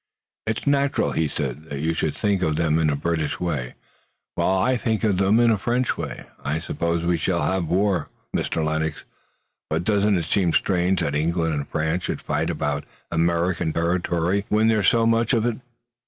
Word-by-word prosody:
"It's 110 Hz, 0 st, -2 dB
natural," 140 Hz, 0 st, +2 dB
he 80 Hz, -, +1 dB
said, 75 Hz, 0 st, -4 dB
"that 70 Hz, -, -4 dB
you 80 Hz, +3 st, 0 dB
should 80 Hz, -2 st, -1 dB
think 100 Hz, -3 st, 0 dB
of 80 Hz, -4 st, +1 dB
them 80 Hz, 0 st, +2 dB
in 80 Hz, -1 st, +2 dB
a 75 Hz, -, +1 dB
British 80 Hz, 0 st, -1 dB
way, 75 Hz, -9 st, -3 dB, 0.6 s
while 95 Hz, -, +1 dB
I 130 Hz, +7 st, +2 dB
think 115 Hz, -2 st, -1 dB
of 105 Hz, -4 st, +2 dB
them 100 Hz, +4 st, +4 dB
in 120 Hz, -1 st, +5 dB
a 110 Hz, -, +1 dB
French 120 Hz, +4 st, 0 dB
way. -, -, -6 dB, 0.2 s
I 75 Hz, +2 st, -1 dB
suppose 85 Hz, +1 st, -2 dB
we 85 Hz, 0 st, +2 dB
shall 85 Hz, +2 st, 0 dB
have 95 Hz, -3 st, 0 dB
war, 95 Hz, -1 st, +1 dB, 0.3 s
Mr. 80 Hz, -, -1 dB
Lennox, 80 Hz, 0 st, -2 dB, 0.7 s
but 80 Hz, +2 st, 0 dB
doesn't 105 Hz, 0 st, +2 dB
it 85 Hz, -, -2 dB
seem 90 Hz, -1 st, +1 dB
strange 90 Hz, -1 st, +2 dB
that 75 Hz, -, -1 dB
England 80 Hz, +2 st, 0 dB
and 70 Hz, -1 st, -3 dB
France 80 Hz, +3 st, -1 dB
should -, -, -2 dB
fight -, -, -1 dB
about 75 Hz, 0 st, -1 dB, 0.3 s
American 85 Hz, 0 st, +1 dB
territory, 85 Hz, +2 st, 0 dB
when 110 Hz, +1 st, +3 dB
there's 110 Hz, -3 st, +2 dB
so 115 Hz, -1 st, +4 dB
much 115 Hz, +1 st, +2 dB
of 115 Hz, -2 st, +2 dB
it? 120 Hz, -2 st, -1 dB
85 Hz, 190 wpm, -23 LUFS, 80-105 Hz, 0.7 s, in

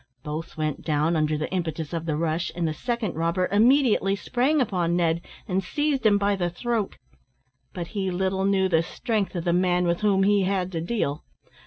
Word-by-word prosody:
Both 155 Hz, +2 st, -6 dB
went 155 Hz, -2 st, -2 dB
down, 155 Hz, +2 st, +1 dB
under 155 Hz, -1 st, +1 dB
the 155 Hz, -, -2 dB
impetus 160 Hz, -4 st, -3 dB
of 165 Hz, 0 st, -3 dB
the 150 Hz, -2 st, 0 dB
rush, 165 Hz, +1 st, -1 dB
and 170 Hz, -1 st, 0 dB
the 155 Hz, -, -1 dB
second 235 Hz, +1 st, -2 dB
robber 170 Hz, +3 st, 0 dB
immediately 225 Hz, -2 st, +4 dB
sprang 250 Hz, -, +1 dB
upon 180 Hz, -8 st, +1 dB
Ned, 170 Hz, -1 st, +1 dB, 0.3 s
and 190 Hz, -1 st, 0 dB
seized 290 Hz, +1 st, 0 dB
him 205 Hz, -1 st, +5 dB
by 200 Hz, 0 st, +1 dB
the 175 Hz, -2 st, -1 dB
throat. 220 Hz, +3 st, -2 dB, 0.7 s
But 175 Hz, -2 st, -6 dB
he 195 Hz, -3 st, -2 dB
little 190 Hz, +1 st, 0 dB
knew 195 Hz, -1 st, +3 dB
the 165 Hz, -3 st, +3 dB
strength 205 Hz, +1 st, -2 dB
of 170 Hz, -, -2 dB
the 170 Hz, -, +1 dB
man 180 Hz, 0 st, +2 dB
with 170 Hz, +2 st, 0 dB
whom 200 Hz, -2 st, +3 dB
he 200 Hz, 0 st, +4 dB
had 185 Hz, -1 st, 0 dB
to 165 Hz, -2 st, -3 dB
deal. 165 Hz, -6 st, -2 dB
180 Hz, 195 wpm, -25 LUFS, 165-205 Hz, 0.7 s, him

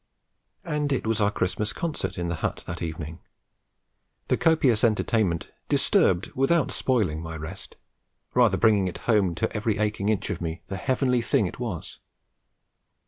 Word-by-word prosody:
And 150 Hz, -5 st, -1 dB
it 130 Hz, -, 0 dB
was 110 Hz, -1 st, 0 dB
our 100 Hz, -, +4 dB
Christmas 105 Hz, +1 st, -1 dB
concert 165 Hz, -10 st, -3 dB
in 85 Hz, -1 st, -2 dB
the 85 Hz, -, -1 dB
hut -, -, -2 dB
that -, -, -6 dB
evening: 80 Hz, 0 st, -5 dB, 1.1 s
the -, -, +4 dB
copious 140 Hz, -9 st, +3 dB
entertainment 110 Hz, -6 st, +1 dB, 0.2 s
disturbed 90 Hz, 0 st, +2 dB
without 135 Hz, +4 st, +2 dB
spoiling 105 Hz, -, 0 dB
my 80 Hz, 0 st, -6 dB
rest, 80 Hz, +5 st, -8 dB, 0.6 s
rather 120 Hz, -6 st, +4 dB
bringing 105 Hz, -4 st, +4 dB
it 85 Hz, -1 st, -4 dB
home 100 Hz, -7 st, +3 dB
to 80 Hz, -, -2 dB
every 105 Hz, -1 st, 0 dB
aching 105 Hz, -1 st, 0 dB
inch 105 Hz, -1 st, 0 dB
of 90 Hz, -, -4 dB
me 85 Hz, 0 st, -4 dB
as -, -, -36 dB
the 95 Hz, -, -3 dB
heavenly 125 Hz, +4 st, +1 dB
thing 110 Hz, -, +2 dB
it 90 Hz, -, -6 dB
was. 110 Hz, -10 st, -5 dB
105 Hz, 160 wpm, -26 LUFS, 90-120 Hz, 1.1 s, our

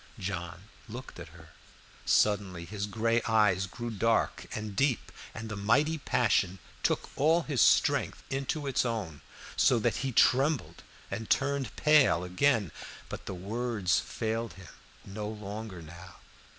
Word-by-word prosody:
John 90 Hz, -1 st, -5 dB, 0.3 s
looked 120 Hz, -3 st, -8 dB
at 90 Hz, -, -8 dB
her; 80 Hz, -1 st, -15 dB, 0.6 s
suddenly 95 Hz, -5 st, +2 dB
his 100 Hz, +2 st, -4 dB
gray 115 Hz, +3 st, +1 dB
eyes 105 Hz, -4 st, +3 dB
grew 120 Hz, +4 st, -6 dB
dark 115 Hz, +2 st, 0 dB
and 105 Hz, -2 st, -5 dB
deep, 140 Hz, -1 st, +1 dB, 0.2 s
and 110 Hz, +1 st, -7 dB
the 105 Hz, -, -5 dB
mighty 140 Hz, +11 st, +2 dB
passion 105 Hz, -8 st, +1 dB, 0.2 s
took -, -, 0 dB
all 160 Hz, +4 st, +3 dB
his 145 Hz, -6 st, 0 dB
strength -, -, +3 dB
into 135 Hz, +2 st, -2 dB
its 135 Hz, -2 st, +1 dB
own, 105 Hz, -, -3 dB, 0.3 s
so 125 Hz, -, +4 dB
that 115 Hz, +1 st, 0 dB
he 135 Hz, +1 st, -2 dB
trembled 135 Hz, +5 st, +2 dB, 0.3 s
and 110 Hz, -1 st, -4 dB
turned 140 Hz, -3 st, 0 dB
pale 150 Hz, -, +4 dB
again. 100 Hz, -, +1 dB, 0.4 s
But -, -, -7 dB
the 95 Hz, -, -4 dB
words 105 Hz, 0 st, 0 dB
failed 115 Hz, 0 st, -3 dB
him 95 Hz, -4 st, -13 dB, 0.4 s
no 105 Hz, +1 st, -5 dB
longer 105 Hz, -3 st, -7 dB
now. 85 Hz, +3 st, -12 dB
110 Hz, 140 wpm, -30 LUFS, 95-125 Hz, 0.6 s, so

